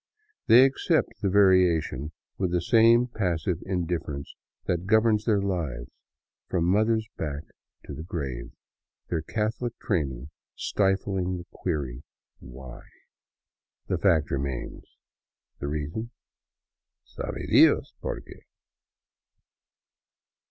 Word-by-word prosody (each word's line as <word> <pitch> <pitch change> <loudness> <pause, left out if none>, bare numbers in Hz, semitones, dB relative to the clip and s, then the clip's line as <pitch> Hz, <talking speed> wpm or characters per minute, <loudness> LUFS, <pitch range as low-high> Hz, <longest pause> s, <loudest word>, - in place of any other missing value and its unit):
They 120 +3 +8
accept 135 - 0
the 100 - +1
variation 90 -7 +3 0.3
with 95 -3 0
the 90 - +2
same 115 +6 +5
passive 90 - -2
indifference 85 -6 -3 0.3
that 90 +1 -1
governs 110 0 +3
their 105 -3 +3
lives 80 -11 -3 0.6
from 85 -2 +1
mother's 110 +4 +2
back 75 -1 -4 0.4
to - - -7
the - - -7
grave, 70 -8 -5 0.6
their 85 -2 -1
Catholic 110 +6 -3
training 70 - -2 0.2
stifling 95 -2 0
the 85 - -9
query 70 -8 -3 0.2
" - - -51
why." 65 -1 -11 1.1
The 90 - 0
fact 85 -6 +2
remains; 70 -2 -4 0.6
the 70 - -4
reason 75 +10 -4 0.4
— - - -66
" - - -65
sabe - - -4
Dios - - +5
porque." - - -7
90 Hz, 110 wpm, -27 LUFS, 75-105 Hz, 1.1 s, They